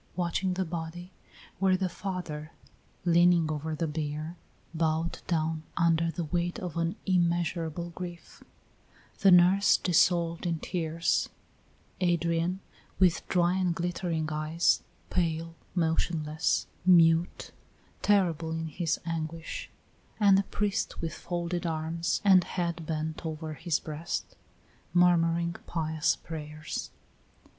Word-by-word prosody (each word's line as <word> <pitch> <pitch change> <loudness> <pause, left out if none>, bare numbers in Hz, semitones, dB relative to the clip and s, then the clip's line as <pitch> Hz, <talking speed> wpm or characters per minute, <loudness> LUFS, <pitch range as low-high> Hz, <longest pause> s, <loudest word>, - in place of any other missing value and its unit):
Watching 180 +1 0
the 190 0 0
body 170 +2 -6 0.5
were 190 -1 +3
the 190 0 0
father, 175 -5 -5 0.5
leaning 170 -2 +4
over 155 +1 -3
the 165 - -1
bier, 155 +1 -4 0.4
bowed 160 0 0
down 160 -2 0 0.2
under 165 -1 +3
the 170 +1 -3
weight 175 +4 -1
of 180 -8 -5
an 170 +2 0
immeasurable 170 -2 0
grief; 175 0 -9 0.8
the 195 - +6
nurse 180 +2 +6
dissolved 170 -1 +2
in 165 -1 0
tears; 165 -1 -1 0.7
Adrian, 170 +1 +1 0.4
with 180 -3 +3
dry 175 0 +2
and 180 -3 +1
glittering 170 -2 -2
eyes, 155 +2 +2 0.3
pale, 165 -2 -1 0.2
motionless, 160 -2 0 0.2
mute, 170 -1 +4 0.5
terrible 170 -6 +2
in 160 0 -3
his 165 +1 -1
anguish; 165 - -4 0.5
and 200 -2 +6
the 195 - +5
priest 205 +1 -2
with 165 -1 -3
folded 175 0 -3
arms 165 +3 -1
and 190 -2 +7
head 170 -3 -3
bent 160 +1 -3
over 160 -1 -4
his 165 +1 -1
breast, 160 +1 -5 0.6
murmuring 170 -1 +3
pious 160 -2 0
prayers. 155 -1 -6
170 Hz, 115 wpm, -29 LUFS, 160-175 Hz, 0.8 s, and